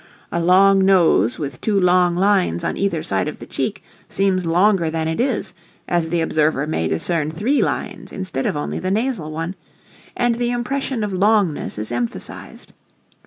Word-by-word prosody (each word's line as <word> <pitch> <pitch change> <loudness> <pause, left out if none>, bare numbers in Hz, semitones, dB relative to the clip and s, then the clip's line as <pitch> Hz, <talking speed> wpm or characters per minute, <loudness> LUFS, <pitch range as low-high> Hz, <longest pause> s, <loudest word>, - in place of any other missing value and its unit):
A 170 - -1
long 190 +3 +5
nose 170 - +3
with 140 -4 -6
two 205 -3 +1
long 180 -1 +3
lines 185 - +2
on - - -1
either 185 -5 -1
side 95 -1 -1
of - - -5
the - - -10
cheek - - -3 0.3
seems 185 -3 0
longer 180 0 +3
than 160 0 -2
it 160 - -2
is, 250 -1 -1 0.3
as 170 -2 0
the 170 0 0
observer 155 -3 +1
may 115 - -1
discern 150 - 0
three 215 - 0
lines - - -3
instead 185 -8 -3
of - - -1
only 145 - -3
the 185 - -2
nasal 220 -5 -1
one, 165 +3 -4 0.6
and 240 -1 +2
the 240 +1 -1
impression 245 0 -2
of 210 - -2
longness 195 - +1
is 105 +2 -3
emphasized. 120 -1 -5
180 Hz, 170 wpm, -20 LUFS, 155-200 Hz, 0.6 s, long